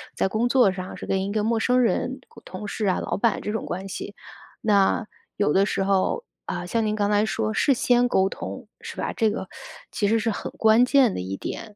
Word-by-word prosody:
在 -, -, +1 dB
工 220 Hz, +5 st, 0 dB
作 245 Hz, -5 st, +4 dB
上 185 Hz, 0 st, -6 dB
是 -, -, -8 dB
跟 190 Hz, 0 st, 0 dB
一 200 Hz, -, -3 dB
个 215 Hz, 0 st, 0 dB
陌 225 Hz, +1 st, +1 dB
生 250 Hz, +3 st, +3 dB
人 255 Hz, +2 st, 0 dB
同 230 Hz, -, -16 dB
同 200 Hz, +3 st, -7 dB
事 215 Hz, -, -3 dB
啊 185 Hz, -, +1 dB
老 -, -, -2 dB
板 225 Hz, +1 st, +1 dB
这 210 Hz, -, -3 dB
种 220 Hz, -, -3 dB
关 190 Hz, +2 st, -5 dB
系。 200 Hz, +2 st, -6 dB, 0.5 s
那 210 Hz, +2 st, +3 dB, 0.3 s
有 205 Hz, -, +1 dB
的 195 Hz, +1 st, +4 dB
时 195 Hz, -, -1 dB
候， 195 Hz, -, +1 dB, 0.2 s
呃， -, -, -4 dB
像 225 Hz, +5 st, 0 dB
您 215 Hz, -, 0 dB
刚 205 Hz, -1 st, 0 dB
才 210 Hz, +1 st, +3 dB
说 220 Hz, 0 st, -1 dB
事 275 Hz, +4 st, +3 dB
先 245 Hz, 0 st, +3 dB
沟 190 Hz, -5 st, +2 dB
通 -, -, -7 dB
是 -, -, -8 dB
吧？ -, -, -3 dB
这 220 Hz, -2 st, +2 dB
个 205 Hz, -3 st, -4 dB, 0.4 s
其 205 Hz, -, 0 dB
实 225 Hz, +2 st, +3 dB
是 225 Hz, 0 st, 0 dB
很 -, -, -5 dB
关 220 Hz, +2 st, +4 dB
键 260 Hz, -4 st, +4 dB
的 -, -, -4 dB
一 95 Hz, +1 st, -4 dB
点， 215 Hz, -, -7 dB
215 Hz, 250 characters per minute, -24 LUFS, 195-230 Hz, 0.5 s, 作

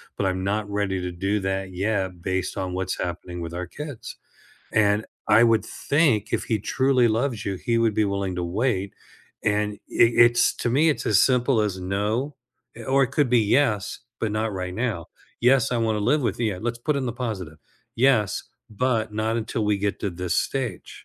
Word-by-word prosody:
but 100 Hz, -, -1 dB
I'm 95 Hz, 0 st, -1 dB
not 105 Hz, +1 st, -1 dB
ready 100 Hz, -2 st, -1 dB
to 90 Hz, -, -3 dB
do 95 Hz, +4 st, -1 dB
that 95 Hz, 0 st, -2 dB
yet 95 Hz, -2 st, -2 dB
based 95 Hz, +1 st, -2 dB
on 95 Hz, -1 st, -3 dB
what's 95 Hz, 0 st, -2 dB
happening 90 Hz, 0 st, -5 dB
with 85 Hz, 0 st, -6 dB
our 90 Hz, 0 st, -4 dB
kids" 145 Hz, -5 st, -8 dB, 0.6 s
And 105 Hz, 0 st, +3 dB, 0.2 s
I 110 Hz, -, +6 dB
would 115 Hz, -2 st, +3 dB
think 140 Hz, -8 st, +1 dB
if -, -, 0 dB
he 110 Hz, -, 0 dB
truly 130 Hz, +3 st, +2 dB
loves 115 Hz, -1 st, -1 dB
you, 100 Hz, -, -2 dB
he 115 Hz, +5 st, -1 dB
would 115 Hz, -2 st, +2 dB
be 110 Hz, -, +2 dB
willing 100 Hz, -2 st, -2 dB
to 90 Hz, -, -2 dB
wait. 100 Hz, +1 st, -1 dB, 0.5 s
And 105 Hz, 0 st, +1 dB
it 115 Hz, 0 st, +4 dB
it's 120 Hz, 0 st, +2 dB
to 120 Hz, -, -1 dB
me, 150 Hz, +6 st, +4 dB
it's 150 Hz, -, 0 dB
as 105 Hz, -, +4 dB
simple 125 Hz, -2 st, +2 dB
as 100 Hz, -3 st, -1 dB
no. 105 Hz, +9 st, -1 dB, 0.5 s
Or 135 Hz, +1 st, +4 dB
it 130 Hz, -, -5 dB
could 145 Hz, -3 st, +2 dB
be 120 Hz, -2 st, +5 dB
yes, 105 Hz, -2 st, +1 dB, 0.2 s
but 110 Hz, -, 0 dB
not 110 Hz, 0 st, -1 dB
right 90 Hz, -1 st, -4 dB
now. 110 Hz, -7 st, -2 dB, 0.3 s
"Yes, 130 Hz, +2 st, +4 dB
I 125 Hz, -, +1 dB
want 110 Hz, -1 st, +1 dB
to 105 Hz, -, -2 dB
live 145 Hz, +6 st, +2 dB
with 120 Hz, -, -1 dB
you." 105 Hz, -5 st, 0 dB
Let's 120 Hz, +1 st, -3 dB
put 150 Hz, +5 st, -1 dB
in 130 Hz, -2 st, -1 dB
the 120 Hz, -, -2 dB
positive. 100 Hz, -11 st, -5 dB, 0.4 s
"Yes, 115 Hz, -6 st, +2 dB, 0.3 s
but 110 Hz, -1 st, 0 dB
not 110 Hz, +1 st, -1 dB
until 115 Hz, 0 st, -2 dB
we 105 Hz, -1 st, +1 dB
get 100 Hz, 0 st, -2 dB
to 100 Hz, -, -1 dB
this 90 Hz, 0 st, -2 dB
stage." 125 Hz, -9 st, -3 dB
105 Hz, 200 wpm, -24 LUFS, 95-120 Hz, 0.6 s, I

